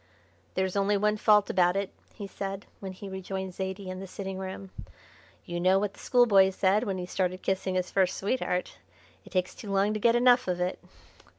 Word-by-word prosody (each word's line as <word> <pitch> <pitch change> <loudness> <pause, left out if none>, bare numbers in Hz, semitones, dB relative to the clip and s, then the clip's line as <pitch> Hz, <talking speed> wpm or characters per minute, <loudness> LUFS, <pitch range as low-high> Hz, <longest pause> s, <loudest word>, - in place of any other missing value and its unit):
"There's 190 0 0
only 200 +1 +2
one 210 +1 +2
fault 210 -1 +4
about 180 0 +3
it," 195 -1 -2 0.2
he 205 - -6
said, 195 0 -5
when 195 -1 -6
he 195 +2 -9
rejoined 190 0 -5
Zaidie 190 +1 -5
in 185 - -6
the 195 - -7
sitting 190 0 -6
room. 190 0 -7 0.7
"You 175 0 -4
know 185 +2 +4
what 200 0 -1
the - - -17
schoolboy 210 -6 +5
said 195 +4 +2
when 195 -2 -2
he 180 - -4
started 185 0 -2
kissing 190 -1 -1
his 185 0 -1
first 190 -1 +2
sweetheart, 195 -4 -2 0.5
'It - - -12
takes 185 -1 -1
too 205 - -8
long 195 +2 +2
to 215 - -2
get 230 +2 +4
enough 245 -1 +5
of 180 -1 -1
it.'" 180 +1 -1
190 Hz, 200 wpm, -28 LUFS, 185-200 Hz, 0.7 s, schoolboy